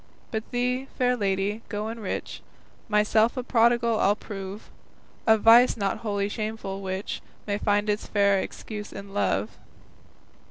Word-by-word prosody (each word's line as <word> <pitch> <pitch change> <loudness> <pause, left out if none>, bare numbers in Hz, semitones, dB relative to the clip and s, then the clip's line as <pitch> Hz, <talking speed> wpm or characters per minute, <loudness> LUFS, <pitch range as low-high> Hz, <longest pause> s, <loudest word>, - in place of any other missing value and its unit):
But 220 -1 -4
thee, 250 +2 -1
fair 250 0 +2
lady, 200 0 -1
to 210 0 -3
enrich, 225 -3 -5 0.5
Myself 215 +3 +3
a 255 - -1
prodigal 235 -1 +3
I'll 200 +1 +4
prove, 200 -1 -8 0.6
A 220 0 +7
vice 230 +4 +6
not 200 -2 -1
wholly 205 -2 -1
shameful, 215 -2 -4
which 190 +1 -4 0.2
May 205 0 -1
find 205 0 +1
its 210 0 -1
fair 200 -1 +3
excuse 210 +2 -6
in 200 0 -9
love. 205 - -1
210 Hz, 135 wpm, -26 LUFS, 200-230 Hz, 0.6 s, A